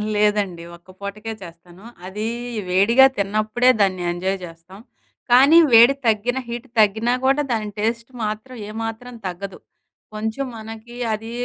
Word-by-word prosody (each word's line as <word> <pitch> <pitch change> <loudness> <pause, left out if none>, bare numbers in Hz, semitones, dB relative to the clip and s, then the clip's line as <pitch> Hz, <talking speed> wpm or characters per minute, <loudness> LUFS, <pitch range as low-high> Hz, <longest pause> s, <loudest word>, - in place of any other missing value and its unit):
లేదండి 205 -5 +1
ఒక్క 175 +2 -21
పూటకే 215 +3 -6
చేస్తాను. 175 +3 -14 0.2
అది 210 +4 -4 0.4
వేడిగా 230 +8 +5
తిన్నప్పుడే 215 +5 +1
దాన్ని 185 -2 +1
ఎంజాయ్ 190 +2 -2
చేస్తాం. 165 +4 -14 0.5
కానీ 275 +7 +7 0.2
వేడి 235 +4 +8
తగ్గినా, 240 +4 +1
హీట్ 240 +2 -6
తగ్గినా 220 +4 +2
కూడా 275 +2 +3
దాని 215 -2 -1
టేస్ట్ 230 +3 -2
మాత్రం, 215 +4 -5
ఏ - - -8
మాత్రం 225 +2 -6
తగ్గదు. 190 +2 -7 0.6
కొంచెం 220 +6 -3
మనకి 225 +2 -10 0.2
అది 225 +2 -6
215 Hz, 130 wpm, -21 LUFS, 195-235 Hz, 0.6 s, వేడి